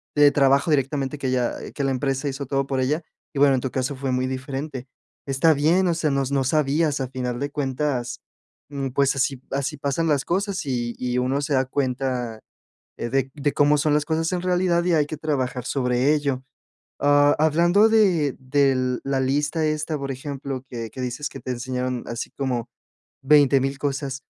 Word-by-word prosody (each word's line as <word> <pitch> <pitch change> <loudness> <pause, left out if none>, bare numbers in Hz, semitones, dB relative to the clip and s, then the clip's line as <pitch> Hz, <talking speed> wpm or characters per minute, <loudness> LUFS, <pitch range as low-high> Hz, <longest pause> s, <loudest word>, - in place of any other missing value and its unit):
de 145 -1 +6
trabajo 140 +2 +3
directamente. 140 -1 0
Que 140 - -3
ella 125 -2 0 0.2
que 140 - -3
la 135 - +1
empresa 135 +1 -1
hizo 140 +1 -5
todo 135 0 -1
por 135 -1 -1
ella. 145 +6 0 0.3
Y 140 - -3
bueno, 140 -1 +5
en - - +1
tu 130 - -3
caso 130 +2 -2
fue 135 -1 -2
muy 125 0 0
diferente. 130 0 -5 0.4
Está 140 +4 +3
bien, 165 +6 +3
o 170 - +2
sea, 160 -2 0
no 140 - +1
s 135 +1 -4
no 135 -1 +2
sabías. 150 0 +1
A 130 - -2
final 125 -2 -3
de 140 +1 -2
cuentas, 135 - -2 0.5
mm, 140 -2 -3
pues 135 +1 +2
así 135 -1 0
así 140 +2 -2
pasan 140 +4 -1
las 145 -3 +1
cosas. 195 +2 -1
Y 120 -3 -2
y, 125 0 -1
uno 130 +3 0
se 145 +1 -2
da 130 - +2
cuenta 125 -3 -2 0.6
de 130 +2 -1
de 145 -1 -1
cómo 145 +1 +4
son 150 0 +2
las 150 0 +2
cosas 160 0 0
en 180 - -1
realidad, 180 -1 +1
y 175 -1 +1
hay 150 -2 +3
que 155 - -6
trabajar 130 -5 -2
sobre 125 +2 +1
ello. 140 -3 -1 0.6
Ah, 145 0 +5
hablando 170 +7 +4
de 185 - +3
del 130 -1 +1
de 135 - -5
la 135 -1 +1
lista 145 +4 0
esta, 155 0 -1
por 140 0 -4
ejemplo, 135 -1 -5
que 115 -2 -6
que 130 - -8
dices 130 +4 -3
que - - -10
te - - -6
enseñaron, 125 0 -3
así 115 0 -5
como 125 -4 -2 0.5
20000 135 -1 +4
cosas. 135 -1 -3
140 Hz, 195 wpm, -23 LUFS, 130-150 Hz, 0.6 s, de